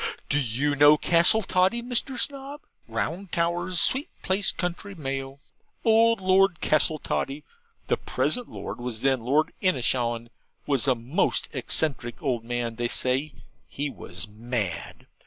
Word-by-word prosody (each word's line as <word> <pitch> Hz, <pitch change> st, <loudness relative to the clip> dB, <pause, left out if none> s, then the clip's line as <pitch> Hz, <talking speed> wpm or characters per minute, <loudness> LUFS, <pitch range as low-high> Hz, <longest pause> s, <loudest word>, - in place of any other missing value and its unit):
Do 145 Hz, -, +2 dB
you 135 Hz, +3 st, -1 dB
know 145 Hz, +1 st, +6 dB
Castletoddy, 185 Hz, +5 st, +3 dB
Mr. 250 Hz, +1 st, 0 dB
Snob? 280 Hz, +1 st, -3 dB, 0.3 s
round 150 Hz, -, -4 dB
towers 175 Hz, +1 st, 0 dB
sweet 270 Hz, -, +4 dB
place 190 Hz, +1 st, +1 dB
County 180 Hz, +3 st, -5 dB
Mayo. 135 Hz, -3 st, -5 dB, 0.5 s
Old 230 Hz, 0 st, +4 dB
Lord 190 Hz, -1 st, +3 dB
Castletoddy 150 Hz, -2 st, 0 dB, 0.4 s
(the -, -, 0 dB
present 245 Hz, -1 st, -1 dB
Lord -, -, -7 dB
was 120 Hz, -2 st, -4 dB
then 135 Hz, -1 st, +2 dB
Lord 145 Hz, +7 st, +1 dB
Inishowan) 120 Hz, -, 0 dB, 0.4 s
was 140 Hz, -3 st, +1 dB
a 130 Hz, -, +4 dB
most 120 Hz, +7 st, 0 dB
eccentric 140 Hz, -6 st, +1 dB
old 125 Hz, -5 st, -1 dB
man 120 Hz, -1 st, -3 dB
they 120 Hz, 0 st, 0 dB
say 130 Hz, +5 st, +1 dB, 0.4 s
he 145 Hz, 0 st, -3 dB
was 90 Hz, +1 st, -7 dB
mad. 110 Hz, -3 st, -5 dB
145 Hz, 130 wpm, -25 LUFS, 120-185 Hz, 0.5 s, know